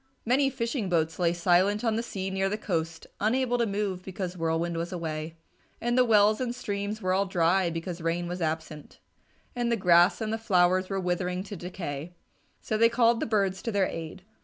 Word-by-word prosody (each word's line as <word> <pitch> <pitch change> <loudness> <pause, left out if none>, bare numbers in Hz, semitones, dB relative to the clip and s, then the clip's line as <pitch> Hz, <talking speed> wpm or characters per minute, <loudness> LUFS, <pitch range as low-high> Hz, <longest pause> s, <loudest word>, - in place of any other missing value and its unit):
Many 270 +4 +3
fishing 235 -5 -2
boats 160 -1 0
lay 170 -2 +3
silent 185 +5 +2
on 225 -2 +1
the 225 - 0
sea 195 -4 -4
near 195 0 0
the 210 - -2
coast 165 -5 -3
unable 245 +3 +1
to 235 - +2
move 200 -3 -2
because 185 -1 -5
Whirlwind 165 0 -1
was 170 +2 -3
away, 160 -2 -4 0.4
and 240 +1 0
the 255 - +5
wells 215 -1 +4
and 245 -1 -2
streams 205 -2 -4
were 185 0 +1
all 195 +1 +1
dry 180 0 +2
because 170 +1 -5
Rain 170 +1 -1
was 180 +1 -5
absent, 160 -2 -4 0.6
and 240 -1 0
the 235 - +2
grass 175 -1 +5
and 220 -1 -2
the 225 - -2
flowers 185 -3 +2
were 195 -1 -1
withering 180 0 -1
to 200 +1 -8
decay. 175 -3 -6 0.5
So 215 - -2
they 230 0 +6
called 235 -1 +3
the - - -2
birds 195 -4 0
to 230 - -3
their 200 -2 +2
aid. 165 +2 -6
190 Hz, 200 wpm, -28 LUFS, 170-220 Hz, 0.6 s, they